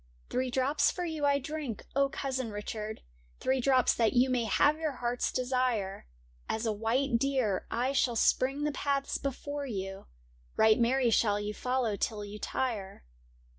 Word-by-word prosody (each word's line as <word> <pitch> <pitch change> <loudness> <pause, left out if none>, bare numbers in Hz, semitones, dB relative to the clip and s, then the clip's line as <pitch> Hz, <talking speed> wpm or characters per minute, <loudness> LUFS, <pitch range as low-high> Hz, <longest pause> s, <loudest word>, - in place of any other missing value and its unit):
' - - -33
Three 255 +1 0
drops 265 +4 +2
for 360 - -3
you 315 -3 -2
I 280 0 +4
drink, 280 -4 -5
O 275 0 +3
Cousin 260 -3 -3
Richard! 210 +1 -5 0.4
Three 260 0 +1
drops 255 -1 +4
that 225 -2 +2
you 255 +1 +4
may 245 -2 +1
have 290 +8 +3
your 310 -3 -1
heart's 245 -1 -1
desire; 250 - -1 0.4
As 220 +1 -1
a 220 - +1
white 230 +4 +1
deer 255 -8 0
I 245 +3 0
shall 255 -3 +1
spring 270 +5 +2
the 300 - +1
paths 280 -1 -1
before 285 +1 -4
you, 195 -4 -5 0.5
Right 220 +1 +5
merry 245 +1 +3
shall 205 -2 +3
you 205 0 -3
follow 250 -2 -1
till 210 -1 -2
you 205 +1 -8
tire.' 210 -8 -3
250 Hz, 170 wpm, -30 LUFS, 220-275 Hz, 0.5 s, Right